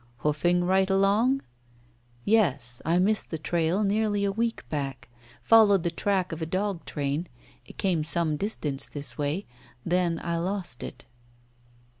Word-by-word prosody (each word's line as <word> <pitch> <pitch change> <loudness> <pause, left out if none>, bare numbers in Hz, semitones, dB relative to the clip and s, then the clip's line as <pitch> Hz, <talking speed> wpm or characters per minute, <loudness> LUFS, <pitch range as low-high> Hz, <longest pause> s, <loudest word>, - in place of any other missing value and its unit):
"Hoofing 175 +4 +2
right 190 +2 +2
along?" 205 +8 +3 0.8
"Yes. 135 - +2
I 165 +3 +2
missed 210 +4 +1
the 160 - -3
trail 170 +5 0
nearly 205 0 +1
a 200 - +1
week 230 +3 -2
back. 135 -4 -4 0.3
Followed 210 -5 +6
the 170 - 0
track 185 +1 0
of 165 0 -5
a 160 - -2
dog 185 +1 -2
train. 145 +3 -2 0.4
It - - -13
came 175 -5 +1
some 160 -1 +1
distance 150 -6 -3
this 140 -5 -7
way. 150 +7 -1 0.4
Then 175 -1 +1
I 170 0 -1
lost 180 -7 -3
it." - - -8
175 Hz, 145 wpm, -27 LUFS, 155-200 Hz, 0.8 s, Followed